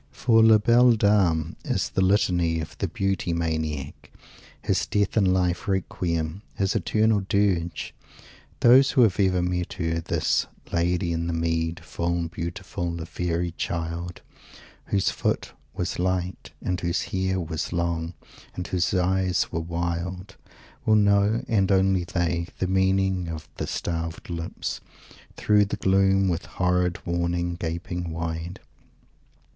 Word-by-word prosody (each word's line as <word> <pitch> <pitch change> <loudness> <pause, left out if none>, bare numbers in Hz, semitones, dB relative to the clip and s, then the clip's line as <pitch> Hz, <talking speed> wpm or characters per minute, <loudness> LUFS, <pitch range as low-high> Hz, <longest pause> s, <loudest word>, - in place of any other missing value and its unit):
For 115 - +3
"La 110 -1 +7
Belle 120 +3 +5
Dame" 95 -7 +2
is - - -1
the - - 0
Litany 90 -4 +2
of 80 - -6
the - - 0
Beauty 95 -3 -1
Maniac 80 -4 -3 0.5
his - - 0
death 100 -1 0
in 100 -4 +4
life 90 +2 0
Requiem, 85 -2 -2
his 95 0 0
eternal 110 -1 +2
Dirge! 90 -5 0 0.7
Those 130 +3 +7
who 130 -2 +4
have 100 -5 +2
ever 95 -2 +3
met 90 0 -2
Her, 80 -1 -1
this 80 - 0 0.3
"Lady 85 +1 +1
in 85 0 -2
the 85 - -1
mead, 80 0 -1
full 85 0 -2
beautiful, 85 0 -4
a 80 - -5
fairy 85 0 -2
child," 85 +1 -4 0.6
whose 100 -2 +1
foot - - -2 0.2
"was 90 -1 -3
light" 90 0 -2
and 90 -1 -1
whose 85 +1 0
hair 95 0 0
"was 80 -2 -3
long" 85 0 -2 0.4
and 90 - -4
whose 90 +1 0
eyes 95 0 +1
"were 85 - -1
wild," 85 +2 -4 0.5
will 110 - +4
know 100 +1 +3
and 100 -3 +2
only 95 -2 +3
they 85 0 -1
the - - -1
meaning 95 -1 +1
of 80 -2 -6
"the - - -3
starved 85 0 -4
lips, 85 0 -4 0.6
through 105 -1 +4
the 100 - -4
gloom, 95 0 +3
with 85 -1 -1
horrid 90 -1 0
warning, 85 0 -1
gaping 85 +1 -4
wide"! 80 +2 -4
90 Hz, 140 wpm, -25 LUFS, 85-95 Hz, 0.7 s, La